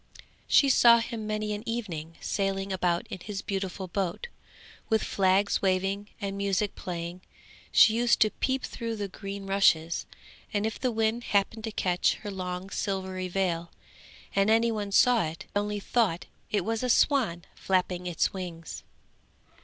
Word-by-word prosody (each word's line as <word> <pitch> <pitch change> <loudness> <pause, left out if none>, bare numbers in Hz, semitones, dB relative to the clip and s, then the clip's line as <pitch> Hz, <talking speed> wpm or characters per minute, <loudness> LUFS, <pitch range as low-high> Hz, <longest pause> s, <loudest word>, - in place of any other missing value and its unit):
She 280 - +5
saw 235 -3 +7
him 230 -2 -4
many 215 0 -2
an 205 - -4
evening 170 -9 -4
sailing 195 -1 -1
about 175 -2 0
in - - -5
his 200 +2 -6
beautiful 190 -1 -3
boat, 190 - -3 0.6
with 220 -1 +2
flags 195 +1 +2
waving 195 +2 0
and 195 -1 -3
music 200 +1 0
playing; 175 0 -6 0.5
she 215 - +7
used 235 +1 +3
to 215 - +5
peep 265 0 -1
through 230 -1 -4
the 205 -2 -3
green 195 +1 -7
rushes, 170 -4 +2 0.4
and 205 0 0
if 220 - -3
the 255 - 0
wind 225 +1 0
happened 210 +2 0
to 220 - -4
catch 180 -3 +1
her 205 - -4
long 185 0 -5
silvery 190 -2 -2
veil 175 -2 -1 0.7
and 195 +1 +3
any 230 +1 +4
one 205 -2 -3
saw 240 +3 +5
it, 160 +1 -6
they 205 - +2
only 205 0 -3
thought 200 -5 0 0.2
it 205 -4 0
was 225 0 -1
a 250 - -1
swan 225 - +2
flapping 180 -1 0
its 175 - 0
wings. 175 -3 -7
200 Hz, 160 wpm, -28 LUFS, 185-220 Hz, 0.7 s, saw